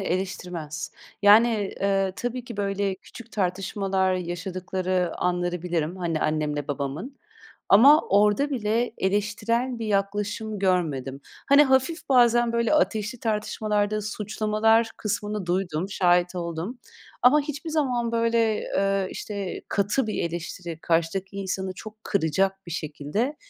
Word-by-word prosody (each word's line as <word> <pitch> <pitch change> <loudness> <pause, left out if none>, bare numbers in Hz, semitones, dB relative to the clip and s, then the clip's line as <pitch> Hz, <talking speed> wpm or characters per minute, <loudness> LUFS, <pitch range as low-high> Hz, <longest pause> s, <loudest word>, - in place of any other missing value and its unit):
eleştirmez. 180 -4 -4 0.3
Yani, 210 0 +5
eee, 195 -1 +1
tabii 245 0 -4
ki 235 -3 -8
böyle 200 -1 -1
küçük 230 +4 -14
tartışmalar 190 0 0
yaşadıkları 180 0 -2
anları 175 -1 -1
bilirim. 170 -1 -2
Hani, 170 -4 -2
annemle 150 -1 -1
babamın. 145 - -4 0.5
Ama 275 +10 +8
orada 210 +8 +3
bile 230 -2 0
eleştirel 210 +5 0
bir 225 - -4
yaklaşım 205 +1 -1
görmedim. 155 -8 0 0.3
Hani, 280 +1 +8
hafif 265 +5 +1
bazen 240 -2 +4
böyle 235 +5 +2
ateşli 225 -4 0
tartışmalarda 215 -1 -1
suçlamalar 215 +2 +1
kısmını 210 -2 -3
duydum, 175 -1 -1
şahit 180 -1 +2
oldum. 170 +6 -4 0.4
Ama 265 +5 +6
hiçbir 295 +2 -5
zaman, 250 -7 0
böyle, 230 -1 +2
eee, 195 -1 0
işte, 200 -3 -5
katı 210 +5 +1
bir 215 - -2
eleştiri, 170 0 -5
karşıdaki 175 +4 0
insanı 190 -1 -3
çok 215 +2 -11
kıracak 195 +2 0
bir 170 - -6
şekilde 160 - -3
200 Hz, 120 wpm, -25 LUFS, 180-225 Hz, 0.5 s, Ama